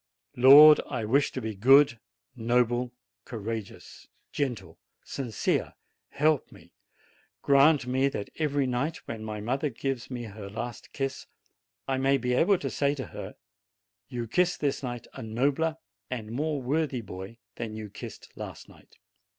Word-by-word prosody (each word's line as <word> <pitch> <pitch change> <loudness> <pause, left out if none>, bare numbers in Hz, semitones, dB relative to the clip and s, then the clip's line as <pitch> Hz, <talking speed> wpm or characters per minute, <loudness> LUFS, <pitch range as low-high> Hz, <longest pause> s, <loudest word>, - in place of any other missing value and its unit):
"Lord, 145 +4 +9
I 115 -3 -2
wish 135 +6 +2
to 130 - -4
be 110 -1 -3
good, 130 +4 +5 0.4
noble, 120 +1 +1 0.3
courageous, 110 -2 -7 0.3
HOPE - - -6
115 145 - +4 0.2
gentle, - - -18 0.2
sincere; 120 -6 -2 0.4
help 150 -1 +1
me; - - -17 0.7
grant 140 +1 +5
that 130 -4 0
every 145 -3 +1
night, 130 +6 -1
when 110 -1 -6
my 105 -1 -5
mother 135 +7 -1
gives 130 0 -4
me 125 -2 -5
her 105 -2 -8
last 120 +2 -6
kiss, 135 -1 -4 0.6
I 135 -1 0
may 135 +1 +3
be 125 -1 -1
able 185 +9 +4
to 140 - -4
say 140 0 +1
to 130 - -5
her, - - -7 0.7
'You 120 -3 -4
kiss 180 +9 +2
this 140 -2 -1
night 120 -3 -5
a - - -8
nobler 140 +8 0 0.3
and 110 -4 -5
more 150 +4 -1
worthy 140 -1 0
boy 95 +2 -9 0.2
than 110 -2 -5
you 110 -2 -7
kissed - - -10
last - - -8
night.' - - -20
125 Hz, 150 wpm, -28 LUFS, 115-140 Hz, 0.7 s, Lord